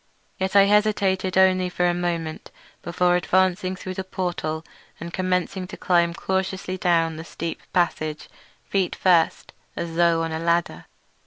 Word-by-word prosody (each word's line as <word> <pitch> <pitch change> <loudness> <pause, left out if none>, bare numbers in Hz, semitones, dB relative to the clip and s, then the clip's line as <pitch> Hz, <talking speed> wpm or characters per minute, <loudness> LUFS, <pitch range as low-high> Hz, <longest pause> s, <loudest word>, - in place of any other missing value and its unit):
Yet 190 +1 -2
I 200 - +8
hesitated 200 -2 +2
only 185 -1 +4
a 175 0 +3
moment 170 -2 -3 0.3
before 175 +1 +1
advancing 185 +1 +1
through 185 0 -6
the 190 - -4
portal 175 -4 -3 0.3
and 170 +1 -7
commencing 185 0 -1
to 185 - -9
climb 170 -1 +2
cautiously 190 0 -2
down 165 -3 +1
the 160 - -6
steep 165 0 -6
passage, 155 -3 -1 0.4
feet 190 -3 -1
first, 175 -3 +2 0.2
as 165 -1 -5
though 170 -1 +3
on 165 - -3
a 160 - -3
ladder. 170 - 0
180 Hz, 145 wpm, -23 LUFS, 170-185 Hz, 0.4 s, I